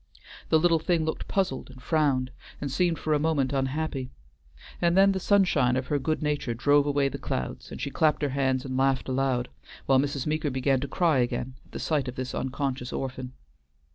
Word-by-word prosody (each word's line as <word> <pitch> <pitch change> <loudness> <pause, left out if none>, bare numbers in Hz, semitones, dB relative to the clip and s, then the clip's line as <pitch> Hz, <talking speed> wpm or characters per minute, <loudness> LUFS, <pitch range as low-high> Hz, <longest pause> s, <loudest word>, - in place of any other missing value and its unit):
The 160 - +5
little 165 0 +3
thing 160 0 +1
looked 160 - -3
puzzled, 185 -12 -1
and 130 0 -13
frowned, 130 -1 +1 0.3
and 140 -2 -4
seemed 170 +3 +1
for 155 - -1
a 150 - +2
moment 145 -4 +1
unhappy, 135 0 -2 0.7
and 170 +1 +3
then 195 +1 +6
the 190 - -1
sunshine 185 -11 +3
of 130 0 -1
her 145 - +1
good 155 +3 -1
nature 145 -5 -1
drove 145 +4 +3
away 140 -1 +2
the 135 - -5
clouds 65 - -4
and - - -7
she 140 - -3
clapped 155 0 +2
her 145 - +1
hands 130 -1 0
and 130 -1 -4
laughed 135 0 +1
aloud, 130 -2 0 0.4
while 135 -1 +4
Mrs. 140 -1 -1
Meeker 155 0 0
began 130 0 +1
to 140 - -3
cry 165 -5 +2
again 120 +1 -1
at - - -25
the - - -4
sight 145 -5 0
of 125 - -5
this 130 0 -4
unconscious 130 -1 -3
orphan. 130 -1 -5
140 Hz, 200 wpm, -27 LUFS, 130-155 Hz, 0.7 s, then